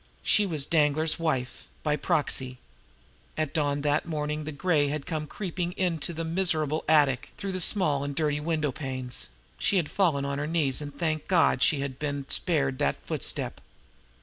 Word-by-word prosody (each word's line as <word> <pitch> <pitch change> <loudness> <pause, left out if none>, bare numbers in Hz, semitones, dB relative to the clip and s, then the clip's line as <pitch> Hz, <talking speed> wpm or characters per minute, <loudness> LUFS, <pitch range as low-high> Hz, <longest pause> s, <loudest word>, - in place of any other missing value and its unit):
She 210 -1 +4
was 155 -6 -1
Danglar's 155 0 +2
wife 135 -6 -2 0.2
by 150 -1 +2
proxy. 145 -6 +1 0.8
At 155 -2 -1
dawn 145 -2 0
that 145 +1 +1
morning 150 -1 -2
when 155 - -6
the 155 - -4
gray 150 0 +2
had 145 0 -3
come 155 -3 -3
creeping 180 -2 -4
into 175 -4 -1
the 165 0 -4
miserable 160 -3 0
attic 145 -5 +3
through 200 -1 -3
the 185 -1 -2
small 155 -7 +4
and 145 0 -4
dirty 150 -2 0
window 155 -2 0
panes, 130 - -4 0.3
she 200 - +2
had 165 -5 0
fallen 160 -8 +2
on 140 0 -2
her 145 - -2
knees 155 -4 +1
and 145 -1 -5
thanked 155 +1 -2
God 165 -8 +3
she 155 -2 +3
had 135 -1 -5
been 145 -2 -3
spared 135 -6 0
that 70 - +2
footstep. - - -1
150 Hz, 175 wpm, -27 LUFS, 140-165 Hz, 0.8 s, She